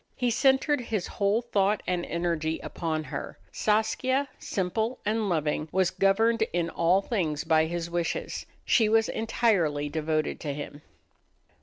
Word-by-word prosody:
He 245 -2 0
centered 270 +3 +3
his 220 -6 -2
whole 205 +4 0
thought 205 -3 +1
and 180 -1 -1
energy 165 -2 -1
upon 160 -2 -3
her. 140 -1 -6
Saskia, 255 +6 +1
simple 220 +6 -2
and 215 0 0
loving, 155 -2 -1
was 185 -1 +2
governed 225 +4 +2
in 170 -1 0
all 180 +4 +2
things 160 -11 -1
by 160 -1 +3
his 170 0 -3
wishes: 170 0 -3 0.2
she 220 -3 +4
was 225 0 +3
entirely 180 -11 +1
devoted 155 0 -1
to 145 -3 -4
him. 145 0 -7
185 Hz, 140 wpm, -27 LUFS, 160-225 Hz, 0.2 s, she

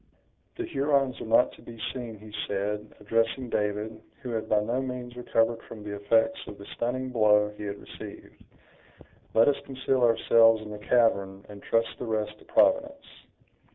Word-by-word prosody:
"The 360 - -3
Hurons 140 - +1
are - - -6
not 115 +3 +4
to - - -16
be 115 -1 -11
seen," 120 -4 -6
he 105 +1 -13
said, 105 +1 -3
addressing 115 +4 0
David, 105 +1 -2 0.2
who 125 - -4
had 110 -1 -3
by 105 - +4
no 120 +5 -1
means 125 -2 -5
recovered 115 -1 +1
from 110 -2 -9
the 105 -1 -5
effects 115 +3 +2
of 105 - -8
the 100 - -11
stunning 130 +2 -2
blow 105 -3 +4
he 105 - -7
had 100 0 -4
received; - - -11 0.9
"let 115 - +6
us 145 - +1
conceal 135 -1 -1
ourselves 115 -1 +5
in 105 - -8
the 105 - -7
cavern, 100 -4 +1
and 100 -1 -10
trust 115 0 +1
the - - -4
rest 105 -1 -2
to - - -18
Providence." 285 0 +2
115 Hz, 175 wpm, -27 LUFS, 105-125 Hz, 0.9 s, let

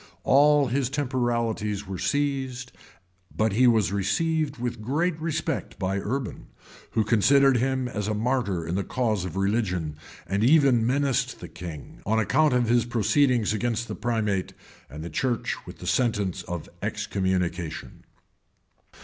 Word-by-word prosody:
All 145 +1 +5
his 130 0 0
temporalities 120 -6 -1
were 95 -2 -6
seized;[] 135 -3 -1 0.6
but 110 -1 0
he 125 +4 +5
was 110 -7 +3
received 155 - 0
with 120 -1 -4
great 155 +9 0
respect 160 -1 -2
by 95 +1 -1
Urban, 125 +4 -4 0.5
who 110 - +2
considered 135 +5 +4
him 130 +1 0
as 105 -4 -3
a 110 - 0
martyr 110 -7 0
in 80 - -3
the 100 +2 0
cause 110 -7 -1
of 90 - -6
religion, 95 -6 0 0.3
and 100 +3 -1
even 130 -4 +5
menaced 135 0 0
the - - -8
king, 80 -6 -9
on 110 +2 +1
account 145 +7 +3
of 120 -2 +2
his 120 0 +3
proceedings 120 0 +2
against 115 +1 -1
the 110 - -4
primate 105 -4 -1 0.4
and 75 +4 -8
the 85 - -5
church 120 - -1
with - - -9
the - - -10
sentence 105 -7 0
of 85 -3 -5
excommunication. 90 -4 -2
115 Hz, 145 wpm, -26 LUFS, 100-130 Hz, 0.6 s, All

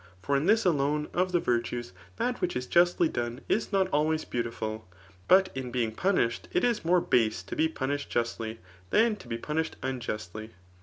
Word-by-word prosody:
For 140 - +1
in 140 +4 +1
this 220 0 +4
alone 150 -2 +1
of 180 +1 +1
the 175 - +3
virtues, 120 - -1 0.2
that 245 +2 -2
which 180 - -1
is 125 0 -2
justly 175 +2 +4
done 120 -3 -3
is 215 +1 0
not 195 -2 +3
always 155 +1 +1
beau^* 120 - -1
tiful> 110 -3 -5 0.4
but 190 +1 +6
in 130 -1 -4
being 120 -3 0
punished, 115 - 0
it 180 - +2
is 235 -3 +1
more 175 +2 +3
base 110 - +1
to 100 - -6
be 160 - +3
punished 145 -2 -3
justly, 115 -1 -2 0.3
than 225 0 +3
to 130 - -13
be 115 -1 -3
punished 155 +6 -2
unjustly. 110 -5 -4
140 Hz, 190 wpm, -28 LUFS, 115-175 Hz, 0.4 s, but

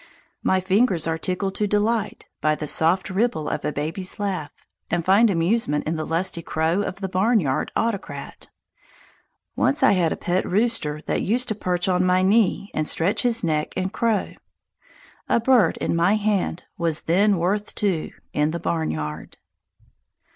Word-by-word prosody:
My 190 - +2
fingers 185 -2 +2
are 165 0 -1
tickled 190 +3 -2
to 210 - 0
delight 210 +1 0 0.2
by 155 0 +2
the 150 - -5
soft 180 +6 +2
ripple 190 -6 0
of - - -3
a - - -1
baby's 160 +7 -4
laugh, 190 -7 -2 0.4
and 170 -1 -1
find 205 +5 +5
amusement 170 -3 0
in 160 - -1
the 155 -1 -4
lusty 170 +1 -1
crow 160 +4 0
of 195 - -3
the 190 - -1
barnyard 185 - +1
autocrat. 195 -11 -3 1.1
Once 135 - +1
I - - +6
had 175 -4 +2
a - - -2
pet 180 +1 0
rooster 190 -8 0
that - - -1
used 245 +5 0
to - - +1
perch 180 -2 -1
on 180 -1 +2
my 185 0 +3
knee 200 0 +2
and 155 -1 -1
stretch 180 +6 +1
his 235 -2 +1
neck 155 -2 -1
and 190 +2 -2
crow. 225 -3 0 1.0
A - - +3
bird 230 -7 +3
in - - -1
my 175 +5 +3
hand 205 -5 -1 0.2
was 165 -2 0
then 195 +4 +3
worth 200 +5 -1
two 190 -7 0 0.2
in 150 +1 +1
the 170 +2 -3
barnyard. 80 - -3
185 Hz, 165 wpm, -23 LUFS, 160-205 Hz, 1.1 s, I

